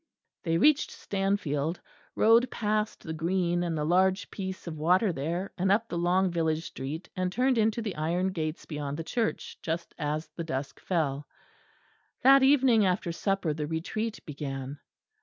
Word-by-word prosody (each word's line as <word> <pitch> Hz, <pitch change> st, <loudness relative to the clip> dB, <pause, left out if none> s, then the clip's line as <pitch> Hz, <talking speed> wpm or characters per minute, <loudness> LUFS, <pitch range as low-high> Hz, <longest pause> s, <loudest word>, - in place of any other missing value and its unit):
They 165 Hz, -1 st, +1 dB
reached 300 Hz, -, +4 dB
Stanfield, 180 Hz, -6 st, -1 dB, 0.4 s
rode 230 Hz, +3 st, +5 dB
past 215 Hz, 0 st, -1 dB
the 160 Hz, -, -5 dB
green 175 Hz, +2 st, 0 dB
and 170 Hz, -2 st, -1 dB
the 150 Hz, -, -1 dB
large 185 Hz, +3 st, +2 dB
piece 190 Hz, -1 st, -5 dB
of 160 Hz, -3 st, -6 dB
water 180 Hz, +5 st, +3 dB
there, 170 Hz, +7 st, -3 dB
and 190 Hz, +1 st, +2 dB
up 225 Hz, +3 st, +2 dB
the 175 Hz, -, -4 dB
long 180 Hz, +2 st, +2 dB
village 160 Hz, -1 st, 0 dB
street, 145 Hz, +6 st, -6 dB
and 185 Hz, 0 st, -1 dB
turned 250 Hz, +3 st, +2 dB
into 220 Hz, +1 st, +1 dB
the 205 Hz, -5 st, -3 dB
iron 170 Hz, +5 st, 0 dB
gates 155 Hz, -3 st, -4 dB
beyond 145 Hz, -2 st, -4 dB
the 165 Hz, -, -4 dB
church, 225 Hz, +6 st, -2 dB
just 165 Hz, +1 st, -3 dB
as 150 Hz, +2 st, -2 dB
the 170 Hz, -, -6 dB
dusk 135 Hz, -4 st, -4 dB
fell. 145 Hz, -5 st, -1 dB, 1.0 s
That 270 Hz, +1 st, +8 dB
evening 265 Hz, -5 st, +5 dB
after 180 Hz, -2 st, +1 dB
supper 190 Hz, -2 st, -1 dB
the 150 Hz, 0 st, -3 dB
Retreat 205 Hz, +8 st, -3 dB
began. 140 Hz, -2 st, -5 dB
175 Hz, 160 wpm, -28 LUFS, 155-200 Hz, 1.0 s, That